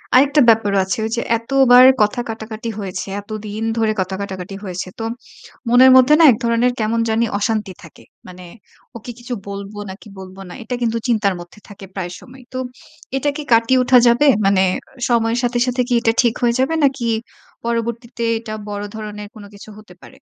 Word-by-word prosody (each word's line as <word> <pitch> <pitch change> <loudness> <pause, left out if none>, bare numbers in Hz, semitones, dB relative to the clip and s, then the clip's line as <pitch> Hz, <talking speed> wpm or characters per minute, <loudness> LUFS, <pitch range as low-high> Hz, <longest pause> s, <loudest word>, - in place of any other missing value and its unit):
আরেকটা 280 +3 +5
ব্যাপারও 210 -3 +3
আছে 190 - -2
ওই 220 - -4
যে, - - 0 0.2
এতবার 250 +1 +5 0.2
কথা 210 +3 +1
কাটাকাটি 220 +1 -6
হয়েছে, 185 -2 -5
এতদিন 215 +1 -6
ধরে 220 -1 +1
কথা 190 +1 -3
কাটাকাটি 190 -1 -6
হয়েছে। 185 -1 -5
তো 225 - -3 0.6
মনের 255 +2 +7
মধ্যে 260 +3 +5
না - - +6
এক 220 - 0
ধরনের 235 +1 +2
কেমন 220 +1 0
জানি 225 +1 +1
অশান্তি 215 -3 -2
থাকে। 165 - -15 0.2
মানে 180 0 -11 0.5
ওকে 235 +2 -9
কিছু 240 +1 -6 0.2
বলব 200 +1 -7 0.2
নাকি 195 +3 -13
বলবো 190 0 -11
না - - -9
এটা 250 - -4
কিন্তু 230 -1 0
চিন্তার 215 -5 +1
মধ্যে 175 +4 -13
থাকে 200 -1 -11
প্রায় 180 -3 -4
সময়। 260 0 -15
তো 255 - -3 0.6
এটা 290 +2 0
কি 300 - -5
কাটিয়ে 230 +3 +3
উঠা 250 0 +5
যাবে? 240 +5 +4 0.2
মানে 195 -1 +3 0.5
সময়ের 230 0 +1
সাথে, 240 0 0
সাথে 250 0 0
কি 250 - -1
এটা 225 -1 +2
ঠিক 235 -3 +1
হয়ে 235 -1 +2
যাবে 265 +5 +1
নাকি 265 -3 -1 0.6
পরবর্তীতে 235 +1 -3 0.2
এটা 225 -1 -8 0.2
বড় 205 0 -5
ধরনের 210 -1 -7
কোন 215 - -11
কিছু 205 +1 -13
হতে 210 -4 -16
পারে? 265 - -15
225 Hz, 185 wpm, -18 LUFS, 205-245 Hz, 0.6 s, মনের